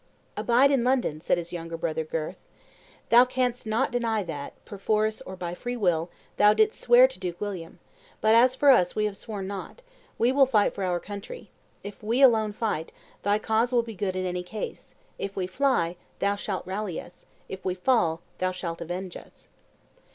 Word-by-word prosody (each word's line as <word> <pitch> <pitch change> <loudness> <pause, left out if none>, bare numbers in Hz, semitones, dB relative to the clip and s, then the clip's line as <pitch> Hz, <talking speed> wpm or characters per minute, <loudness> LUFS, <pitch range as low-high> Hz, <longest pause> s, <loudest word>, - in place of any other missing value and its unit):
"Abide 250 +4 +4
in 270 -4 +2
London," 245 - +1
said - - +1
his 175 0 -5
younger 165 -1 -5
brother, 160 -1 -2
Gurth: 155 0 -4 0.7
"thou 240 +1 +8
canst 250 -2 -1
not 225 +5 +1
deny 230 -3 0
that, 145 -5 -6
perforce 215 +2 -1
or 190 - -8
by 175 -2 -5
free 245 +7 -4
will, 175 -5 +1 0.3
thou 210 0 +6
didst 435 0 +2
swear - - +7
to - - -11
Duke 175 -1 -5
William; 185 -6 -5 0.4
but, 220 0 +4
as 250 +3 +5
for 280 +1 +6
us, 180 -9 +3
we 215 - +1
have 210 -2 -2
sworn 205 -1 -6
nought; 200 - -7 0.3
we 240 +2 +3
will 270 0 +5
fight 215 -5 +3
for 195 - -4
our 180 -1 0
country; 205 - -9 0.3
if 205 +2 -9
we 230 +5 +2
alone 220 -5 +5
fight, 205 -7 -3 0.3
thy 205 +1 +2
cause 220 +3 +1
will 240 -2 +3
be 230 -1 -8
good 190 -1 -2
in 185 0 -2
any 180 0 -2
case; 205 +4 -7 0.2
if 195 0 -4
we 190 - -1
fly, 185 -5 +1 0.2
thou 200 +1 +1
shalt 200 -2 -4
rally 190 -2 -3
us; - - -14 0.2
if 190 - -8
we 185 -1 -1
fall, 180 -6 +1 0.2
thou 185 0 +1
shalt 170 -2 -5
avenge 175 +2 -5
us." - - -13
205 Hz, 190 wpm, -26 LUFS, 180-235 Hz, 0.7 s, thou